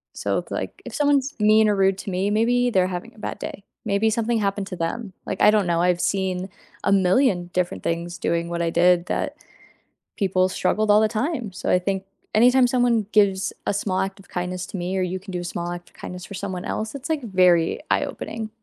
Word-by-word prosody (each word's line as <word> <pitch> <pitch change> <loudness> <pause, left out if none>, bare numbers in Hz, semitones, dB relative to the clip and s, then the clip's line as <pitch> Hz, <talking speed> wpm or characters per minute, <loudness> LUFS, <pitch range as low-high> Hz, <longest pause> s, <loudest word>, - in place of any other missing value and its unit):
So, - - -1
it's - - -10
like, - - -4
if - - -8
someone's 285 -2 +2
mean 215 +1 +5
or 205 - +2
rude 195 -1 +3
to - - -6
me, 190 +3 0
maybe 245 +3 +2
they're 185 -2 +3
having 185 +6 -6
a - - -16
bad - - -5
day, 200 - -7 0.2
maybe 200 +3 +2
something 230 +1 0
happened 200 -1 -1
to 185 - -6
them, 190 +5 -3
like, 190 - -4
I 210 - +7
don't 210 -4 +2
know. 170 0 +1
I've 180 0 +2
seen 185 0 -1 0.4
a - - +3
million 185 -1 +3
different 180 -1 -1
things 170 +1 -2
doing 170 0 0
what 170 0 -2
I 170 - +1
did 175 +1 +3
that - - -2 0.8
people 185 -3 +2
struggled 210 +3 +1
all 210 +1 +6
the 220 - +4
time, 240 - -2
so - - -4
I 180 - +4
think, 190 +1 -2 0.3
anytime 250 +3 +6
someone 240 -4 +2
gives 195 -2 +3
a - - +2
small 190 -2 -1
act 195 +1 -3
of 195 - -16
kindness 180 0 -3
to - - -9
me, 180 +2 -2
or - - +1
you 180 +1 -2
can 190 +1 -10
do 180 - -2
a 175 - -6
small 175 0 -4
act 175 0 -7
of - - -30
kindness 180 0 -8
for 200 - -10
someone 185 -2 -4
else, 220 +3 -3
it's 280 +3 -7
like 305 -5 -1
very 180 -5 +3
eye-opening. 220 -1 -2
195 Hz, 225 wpm, -23 LUFS, 180-220 Hz, 0.8 s, I